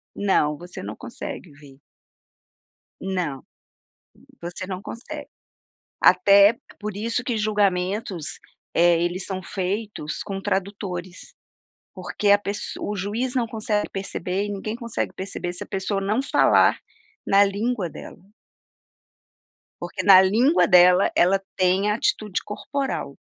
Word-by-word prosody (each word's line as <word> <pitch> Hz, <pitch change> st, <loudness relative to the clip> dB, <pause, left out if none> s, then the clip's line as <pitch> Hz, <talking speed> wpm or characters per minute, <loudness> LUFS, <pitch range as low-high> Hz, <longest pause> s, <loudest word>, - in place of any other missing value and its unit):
Não, 150 Hz, -7 st, +1 dB
você 175 Hz, +1 st, -9 dB
não 105 Hz, +2 st, -6 dB
consegue 195 Hz, -6 st, -8 dB
ver. 140 Hz, -2 st, -16 dB, 1.2 s
Não, 180 Hz, -8 st, -3 dB, 1.0 s
você 175 Hz, +2 st, -6 dB
não 185 Hz, 0 st, -5 dB
consegue. 235 Hz, +3 st, -8 dB, 0.7 s
Até 200 Hz, +3 st, +6 dB, 0.2 s
por 210 Hz, -1 st, -5 dB
isso 230 Hz, +3 st, -1 dB
que 240 Hz, -3 st, -1 dB
julgamentos, 200 Hz, -4 st, -1 dB, 0.4 s
eh, 170 Hz, 0 st, +4 dB
eles 175 Hz, +2 st, -1 dB
são 190 Hz, -1 st, -3 dB
feitos 190 Hz, -3 st, -4 dB
com 195 Hz, -2 st, -5 dB
tradutores, 190 Hz, -2 st, -4 dB, 0.6 s
porque 205 Hz, -, -1 dB
a 205 Hz, -, +7 dB
pesso 205 Hz, +1 st, -4 dB
o 210 Hz, -, -3 dB
juiz 225 Hz, +7 st, -2 dB
não 240 Hz, -3 st, +1 dB
consegue 215 Hz, -1 st, -1 dB
perceber 195 Hz, 0 st, -3 dB
e 205 Hz, -, -4 dB
ninguém 210 Hz, +2 st, -4 dB
consegue 235 Hz, -2 st, -3 dB
perceber 185 Hz, -2 st, -5 dB
se 180 Hz, -, -6 dB
a -, -, -18 dB
pessoa 195 Hz, +1 st, -2 dB
não 210 Hz, +6 st, 0 dB
falar -, -, +4 dB, 0.5 s
na 200 Hz, +1 st, +5 dB
língua 205 Hz, 0 st, -1 dB
dela. -, -, -11 dB, 1.6 s
Porque -, -, -4 dB
na 190 Hz, -2 st, +9 dB
língua 235 Hz, -, +4 dB
dela, 180 Hz, +1 st, +6 dB
ela 190 Hz, +3 st, +3 dB, 0.2 s
tem 185 Hz, +2 st, +2 dB
a 210 Hz, -, +2 dB
atitude 215 Hz, -, -1 dB
corporal. 270 Hz, +6 st, -4 dB
195 Hz, 125 wpm, -23 LUFS, 180-210 Hz, 1.6 s, na